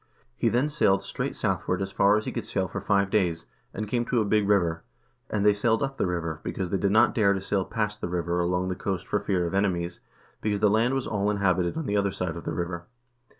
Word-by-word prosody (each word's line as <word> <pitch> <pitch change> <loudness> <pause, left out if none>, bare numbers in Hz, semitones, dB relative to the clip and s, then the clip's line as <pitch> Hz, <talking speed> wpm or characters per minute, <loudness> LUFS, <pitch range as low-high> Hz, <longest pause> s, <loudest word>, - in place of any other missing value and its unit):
1 - - -38 0.3
He 115 - +1
then 125 +6 +2
sailed 145 -10 +2
straight - - -4
southward - - -1
as 95 0 -3
far 100 +2 +4
as 110 - -3
he - - -3
could - - -3
sail 95 -1 0
for - - -5
five 100 -1 +1
days, 85 -5 +1 0.3
and 110 +1 -4
came 120 +3 0
to 120 - +1
a 110 - +1
big 105 0 +2
river; 85 -5 +2 0.5
2 - - -3
and 105 -1 +1
they 105 - +6
sailed 110 +4 +1
up 135 0 -3
the - - +1
river, 85 -3 -3
because 95 -2 -4
they 100 - +2
did 100 - +2
not 110 +4 +4
dare 105 -5 +3
to 95 - -1
sail 95 0 0
past 105 +1 -3
the - - -3
river 85 0 -1
along 90 +1 0
the 90 - -2
coast 95 -1 -3
for 105 - +1
fear 90 -4 0
of 85 - -3
enemies, 90 -3 0 0.4
because 105 -1 0
the 105 -1 +4
land 115 +5 +2
was 135 - -1
all 100 -1 0
inhabited 95 - +1
on 160 - -3
the 105 -2 0
other 100 0 +2
side 90 -3 -3
of 85 - -8
the 80 - -2
river. 85 0 -4
100 Hz, 260 wpm, -26 LUFS, 90-105 Hz, 0.5 s, they